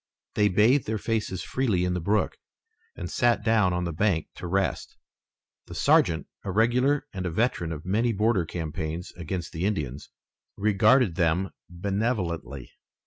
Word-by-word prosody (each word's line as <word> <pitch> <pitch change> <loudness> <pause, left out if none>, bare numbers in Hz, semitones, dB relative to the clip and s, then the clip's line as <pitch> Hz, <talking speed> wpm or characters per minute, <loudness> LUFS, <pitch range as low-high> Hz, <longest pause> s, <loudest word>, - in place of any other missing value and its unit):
They 105 -1 +3
bathed 110 +8 +3
their 110 0 -1
faces 105 -4 -2
freely 110 -9 0
in 90 - 0
the 90 - -1
brook, 105 +5 0 0.6
and - - -5
sat 120 -4 +1
down 110 -4 +3
on 90 0 -1
the 85 -1 -3
bank 85 -2 0
to 90 - -6
rest. 95 +2 -1 0.7
The - - -9
sergeant, 80 -1 +3 0.2
a - - -5
regular 125 +8 +2
and 95 -2 -4
a - - -1
veteran 85 -2 0
of 75 0 -6
many 110 +6 +1
border 105 -2 +2
campaigns 80 0 -4
against 85 +1 -5
the 80 - -4
Indians, 75 -9 -2 0.5
regarded 105 0 +3
them 90 +2 +1 0.2
benevolently. 90 - -2
95 Hz, 150 wpm, -26 LUFS, 85-110 Hz, 0.7 s, They